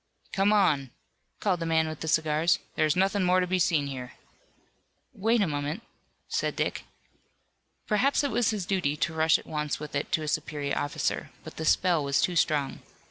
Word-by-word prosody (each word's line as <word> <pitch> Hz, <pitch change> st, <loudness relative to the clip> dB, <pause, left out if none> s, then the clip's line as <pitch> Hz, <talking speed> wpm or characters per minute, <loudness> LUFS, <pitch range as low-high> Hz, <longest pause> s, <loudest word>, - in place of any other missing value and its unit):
"Come 195 Hz, +1 st, +3 dB
on," 160 Hz, -11 st, +3 dB, 0.5 s
called 185 Hz, -4 st, 0 dB
the 165 Hz, -, -3 dB
man 160 Hz, -1 st, +2 dB
with 155 Hz, -1 st, -6 dB
the 160 Hz, -, -5 dB
cigars, 155 Hz, +1 st, +2 dB, 0.2 s
"there 155 Hz, -, +2 dB
is 155 Hz, -, +1 dB
nothing 195 Hz, +2 st, +2 dB
more 180 Hz, 0 st, +3 dB
to 180 Hz, -, +1 dB
be 185 Hz, +1 st, 0 dB
seen 160 Hz, -4 st, +2 dB
here." 125 Hz, -3 st, -6 dB, 1.0 s
"Wait 225 Hz, +3 st, +2 dB
a -, -, 0 dB
moment," 145 Hz, +7 st, -3 dB, 0.4 s
said -, -, -1 dB
Dick. -, -, -2 dB, 1.0 s
Perhaps 260 Hz, +7 st, +2 dB
it 285 Hz, -, 0 dB
was 235 Hz, 0 st, +2 dB
his 210 Hz, -5 st, -2 dB
duty 175 Hz, -7 st, 0 dB
to 155 Hz, +3 st, -1 dB
rush 160 Hz, 0 st, +4 dB
at -, -, -13 dB
once 150 Hz, -2 st, -3 dB
with 150 Hz, -1 st, -8 dB
it 140 Hz, -, -2 dB
to 155 Hz, -, +1 dB
a -, -, -4 dB
superior 145 Hz, -1 st, -2 dB
officer, 145 Hz, -, -2 dB
but -, -, -11 dB
the 160 Hz, -, -3 dB
spell 175 Hz, -2 st, +3 dB
was 140 Hz, 0 st, +1 dB
too 180 Hz, -, +1 dB
strong. 150 Hz, -4 st, +1 dB
160 Hz, 190 wpm, -28 LUFS, 150-190 Hz, 1.0 s, rush